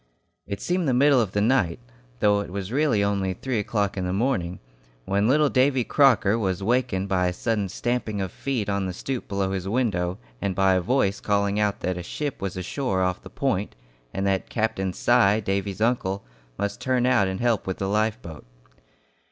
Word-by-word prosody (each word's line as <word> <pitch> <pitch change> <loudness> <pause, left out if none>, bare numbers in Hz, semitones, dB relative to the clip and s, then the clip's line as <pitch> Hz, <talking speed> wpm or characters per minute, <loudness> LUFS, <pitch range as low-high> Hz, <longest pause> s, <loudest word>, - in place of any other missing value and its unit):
It 100 0 -4
seemed 180 -2 0
the 130 - +2
middle 140 0 +5
of 105 -4 -3
the 105 - +1
night, 110 -5 +2 0.4
though 105 -1 +4
it 100 - -5
was 95 +2 -5
really 135 -6 +2
only 100 -2 0
three 125 +2 -2
o'clock 100 -1 -1
in 95 - -2
the 90 - -1
morning, 95 -5 0 0.5
when 100 +2 +1
little 150 +4 +4
Davy 130 -1 +2
Crocker 115 -6 +4
was 95 -3 -1
wakened 105 -4 0
by 90 -2 +1
a 90 - -1
sudden 105 0 -1
stamping 115 -1 -2
of 95 -2 -3
feet 130 -7 -2
on 100 -1 -1
the 90 - -4
stoop 130 +6 -4
below 100 -1 -1
his 95 0 -3
window, 100 -7 0 0.2
and 95 -2 -1
by 95 0 +4
a 90 - +2
voice 100 -1 +1
calling 100 0 +1
out 105 -1 0
that 90 -1 -2
a - - -4
ship 145 - -4
was 95 -2 -3
ashore 95 0 -1
off 90 0 -1
the 95 - -11
Point, 110 -4 -1 0.4
and 95 +2 -2
that 95 -1 0
Captain 110 -4 -1
Si, 110 0 +3
Davy's 100 0 -2
uncle, 105 -5 0 0.3
must 100 0 -3
turn 130 -1 +1
out 120 -6 +3
and 95 0 -3
help 120 -5 +1
with 95 - -2
the 95 - -2
life 110 +3 +1
boat. 80 -3 -9
100 Hz, 200 wpm, -25 LUFS, 95-120 Hz, 0.5 s, middle